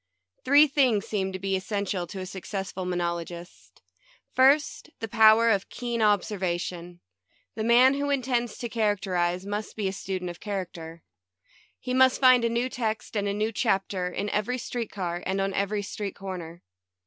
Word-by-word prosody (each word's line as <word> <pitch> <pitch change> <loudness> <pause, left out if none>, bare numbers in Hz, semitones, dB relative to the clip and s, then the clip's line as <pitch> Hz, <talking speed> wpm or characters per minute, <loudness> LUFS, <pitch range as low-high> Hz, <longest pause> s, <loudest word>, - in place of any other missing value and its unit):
Three 285 +3 +7
things 260 -8 +2
seem 190 -3 -2
to 190 - -4
be 195 0 -1
essential 190 -2 -2
to 190 +3 -7
a - - -5
suc 185 -1 -9
cessful 190 -2 -4
monologist. 170 - -5 0.5
First, 285 +4 +3
the 225 - -4
power 220 +1 +6
of 200 -2 0
keen 240 -2 -3
observation. 180 -4 -1 0.5
The 220 - -4
man 245 +3 +6
who 285 +1 -2
intends 245 -4 -1
to 240 - -4
characterize 190 -5 0
must 205 +1 -4
be 210 -3 -1
a 190 - -2
student 185 -2 -4
of 175 - -13
character. 170 -5 -6 0.8
He 250 - -4
must 260 0 +4
find 255 -2 +6
a 235 - +2
new 235 +2 0
text 225 -2 -3
and 205 -1 0
a 200 - 0
new 215 +2 0
chapter 190 -3 0
in 200 +3 -3
every 215 +5 -1
street 235 -2 -4
car, 175 -3 -4
and 190 +1 -1
on 195 0 -1
every 205 +1 -1
street 200 0 -5
corner. 175 -4 -7
205 Hz, 170 wpm, -26 LUFS, 185-235 Hz, 0.8 s, Three